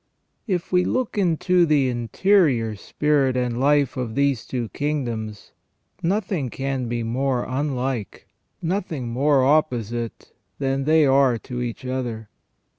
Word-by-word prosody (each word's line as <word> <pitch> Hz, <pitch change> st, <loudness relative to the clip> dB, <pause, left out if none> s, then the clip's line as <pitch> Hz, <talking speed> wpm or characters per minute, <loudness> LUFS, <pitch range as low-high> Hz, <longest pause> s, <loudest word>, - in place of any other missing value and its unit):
If 180 Hz, -5 st, -2 dB
we 180 Hz, 0 st, +4 dB
look 255 Hz, +2 st, -1 dB
into 180 Hz, -1 st, +2 dB
the 150 Hz, -5 st, +3 dB
interior 125 Hz, -, +2 dB
spirit 135 Hz, +3 st, +1 dB
and 125 Hz, -1 st, -1 dB
life 140 Hz, -1 st, +2 dB
of 120 Hz, -3 st, -3 dB
these 140 Hz, -4 st, +1 dB
two 120 Hz, -4 st, -3 dB
kingdoms, 120 Hz, -8 st, -3 dB, 0.5 s
nothing 180 Hz, -, -1 dB
can 135 Hz, 0 st, -3 dB
be 120 Hz, 0 st, -2 dB
more 125 Hz, +2 st, -1 dB
unlike, 130 Hz, -4 st, -3 dB, 0.4 s
nothing 165 Hz, -8 st, -2 dB
more 135 Hz, +2 st, +3 dB
opposite, 120 Hz, -6 st, 0 dB, 0.3 s
than 135 Hz, 0 st, -1 dB
they 155 Hz, 0 st, +5 dB
are 135 Hz, -3 st, +4 dB
to 125 Hz, +1 st, -6 dB
each 120 Hz, +1 st, -5 dB
other. 120 Hz, -4 st, -4 dB
135 Hz, 125 wpm, -23 LUFS, 120-150 Hz, 0.5 s, they